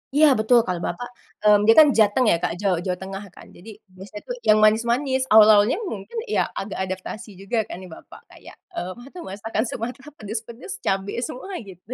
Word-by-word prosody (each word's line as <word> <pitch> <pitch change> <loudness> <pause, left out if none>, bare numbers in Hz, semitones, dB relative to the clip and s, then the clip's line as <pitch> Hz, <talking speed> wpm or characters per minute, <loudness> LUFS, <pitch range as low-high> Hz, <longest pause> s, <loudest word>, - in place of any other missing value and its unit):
Iya 305 +1 +6
betul, 230 +3 +4
kalau 180 -1 -3
bapak, 245 - -5 0.4
mmm, 210 -1 +6
dia - - +9
kan 310 - +9
Jateng 220 +4 +3
ya - - +4
Kak, - - -1
Jaw 195 -2 +2
Jawa 180 -1 -1
Tengah 195 +2 -7
kan, - - -13
jadi 180 +6 -13 0.2
biasanya 200 +3 -10
tuh - - -4
yang 215 - +6
manis-manis. 240 +5 +2
Awal-awalnya 215 - +6
mungkin 215 - -7
ya - - 0
agak 200 +1 -6
adaptasi 190 +4 -6
juga 220 +3 -1
kan - - -6
nih 185 -1 -11
bapak - - -14
kayak, - - -15 0.2
mmm, 185 - -4
nggak 240 +3 -12
tahu 360 -1 -8
masakan 215 +3 -3
Sumatra 250 +5 -6
pedes-pedes, 230 - -7
cabe 195 +1 -2
semua 320 +11 -6
gitu. 195 +3 -11
215 Hz, 190 wpm, -23 LUFS, 195-245 Hz, 0.4 s, dia